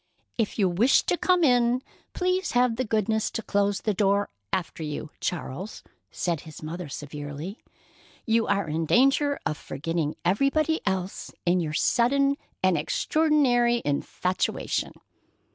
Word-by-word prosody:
"If 225 -3 -1
you 200 -4 +3
wish 205 +9 +4
to - - +1
come 360 0 +2
in, 245 -2 +3 0.3
please 365 0 0
have 245 -1 +3
the 255 - -1
goodness 220 -1 0
to 225 - -4
close 200 -1 +1
the 215 - 0
door 200 +1 +2 0.2
after 175 -2 -2
you, 150 0 -5
Charles," 180 +3 -4 0.3
said 170 -4 -2
his 155 -1 -11
mother 165 +1 -5
severely. 145 - -6 0.7
"You 225 -1 +2
are 200 -3 +1
in 160 +1 -2
danger 275 - +3
of 150 - -2
forgetting 155 +1 -3
everybody 275 - +2
else 190 -1 -2
in 180 +1 +3
your 155 -3 -2
sudden 275 - +2 0.3
and 185 -4 +3
extraordinary 245 - +2
infatuation." 180 +5 -1
205 Hz, 135 wpm, -26 LUFS, 170-250 Hz, 0.7 s, wish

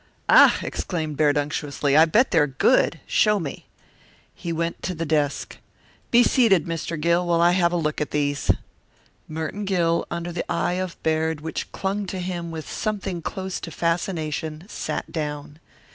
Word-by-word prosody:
"Ah!" - - +8
exclaimed 155 -4 -3
Baird 150 0 +3
unctuously, 145 -1 -1
"I 160 +2 +8
bet 225 +11 +3
they're 155 -3 +4
good. 135 - +2
Show 210 -1 +3
me." 150 -6 -6 0.7
He 170 - -5
went 165 +1 -2
to 180 - -3
the 165 +1 -3
desk. 150 -2 -1 0.5
"Be 240 0 +6
seated, 225 - +4
Mr. 165 -1 -4
Gill, 170 +3 +2
while 170 -1 +2
I 170 +1 +5
have 175 -1 +3
a - - -1
look 150 -2 -1
at 150 - -1
these." 145 -1 -1 0.8
Merton 160 +6 -4
Gill, 170 -4 +1
under 170 0 -4
the 170 - -4
eye 175 +1 0
of 185 -2 -5
Baird 160 -1 0
which 160 +1 -5
clung 195 +1 -2
to 190 - -4
him 175 -2 -4
with 160 -2 -6
something 200 -5 -3
close 190 +2 -4
to - - -7
fascination, 160 -2 -2
sat - - -4
down. 150 -1 -5
165 Hz, 165 wpm, -24 LUFS, 155-180 Hz, 0.8 s, Ah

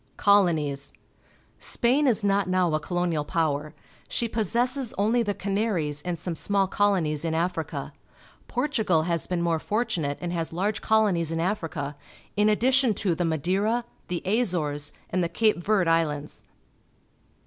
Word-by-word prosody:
Colonies. 155 -8 +2 0.4
— - - -34
Spain 270 +5 +3
is 225 -4 +2
not 200 -2 +2
now 185 -3 +2
a 155 - +2
colonial 175 -1 -1
power. 150 -1 -1 0.3
She 235 - -1
possesses 240 +4 0
only 220 +5 +2
the 205 -3 -1
Canaries 195 -8 -1
and 175 +1 -3
some 175 +1 -4
small 195 +4 +1
colonies 185 -7 +1
in 160 -1 -1
Africa. 160 -4 -2 0.5
Portugal 225 - +1
has 170 -1 -1
been 175 -2 -1
more 165 -2 +1
fortunate 165 -9 -1
and 175 -1 -4
has 165 -2 -2
large 200 +5 -1
colonies 200 -7 +2
in 165 - -1
Africa, 165 -6 -2 0.4
in 210 +1 +3
addition 250 +1 +3
to 185 -3 0
the 175 +1 -1
Madeira, 190 - 0 0.2
the 175 -1 -3
Azores, 175 -9 0 0.2
and 185 - +1
the 170 - 0
Cape 215 +3 +2
Verde 195 -2 +2
Islands. 150 -3 -1
180 Hz, 150 wpm, -26 LUFS, 160-210 Hz, 0.5 s, Spain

